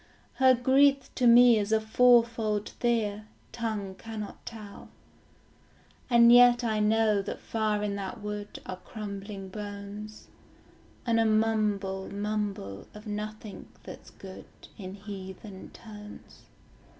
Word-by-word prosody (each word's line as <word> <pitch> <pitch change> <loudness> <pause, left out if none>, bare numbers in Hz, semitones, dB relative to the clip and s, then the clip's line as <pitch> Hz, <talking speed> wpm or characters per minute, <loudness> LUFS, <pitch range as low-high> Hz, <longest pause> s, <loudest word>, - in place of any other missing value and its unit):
Her 260 -1 +5
grief 270 +2 +3
to 250 - +2
me 235 -1 +7
is 205 +1 -3
a 220 - +4
fourfold 230 -2 +2
fear, 215 -3 -1 0.2
Tongue 215 -5 -4
cannot 215 0 -8
tell. 215 -3 -10 1.2
And 235 -1 +6
yet 245 0 +6
I 220 -2 0
know 215 -1 +2
that 195 - -6
far 215 -2 -1
in 205 -1 -2
that 195 -2 -6
wood 210 0 -6
Are 185 - -6
crumbling 200 -1 -8
bones, 205 +1 -8 0.8
And 230 -2 +2
a 225 - +3
mumble 210 -3 0
mumble 200 - -4
of 210 +1 -11
nothing 210 0 -7 0.2
that's - - -11
good, 190 -1 -12 0.3
In 190 -1 -8
heathen 195 -1 -9
tones. 210 -2 -13
210 Hz, 120 wpm, -28 LUFS, 200-230 Hz, 1.2 s, me